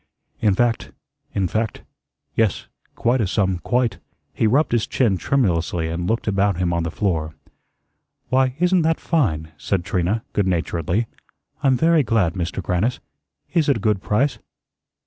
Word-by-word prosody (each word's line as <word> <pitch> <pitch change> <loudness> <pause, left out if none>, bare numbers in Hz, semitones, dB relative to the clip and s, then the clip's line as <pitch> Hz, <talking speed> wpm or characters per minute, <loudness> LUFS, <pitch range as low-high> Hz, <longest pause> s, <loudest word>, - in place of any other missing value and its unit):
In 100 -3 +3
fact 120 +1 0 0.4
in 95 -2 +1
fact 110 +4 -2 0.5
yes, 110 -4 0 0.3
quite 120 +1 +1
a 105 - +1
sum, 95 -2 0
quite." 120 -1 0 0.3
He 110 - +2
rubbed 140 +8 +2
his 115 -2 +1
chin 115 -7 +2
tremulously 85 -9 0
and 85 +1 -3
looked 115 +1 -1
about 100 -2 +2
him 90 -1 0
on 85 - 0
the 85 - -2
floor. 80 -5 -1 0.9
"Why, 130 0 +2
isn't 180 +1 +3
that 160 0 +1
fine?" 80 - 0
said 90 -3 -1
Trina, 95 +5 0
good 100 -2 +1
naturedly. 85 +3 0 0.6
"I'm 135 -3 +3
very 165 +2 +4
glad, 110 - +1
Mister 90 +1 -3
Grannis. 95 +8 0 0.5
Is 160 -4 +2
it 140 - +3
a - - -5
good 105 -2 +1
price?" 130 +9 +1
105 Hz, 155 wpm, -22 LUFS, 90-125 Hz, 0.9 s, very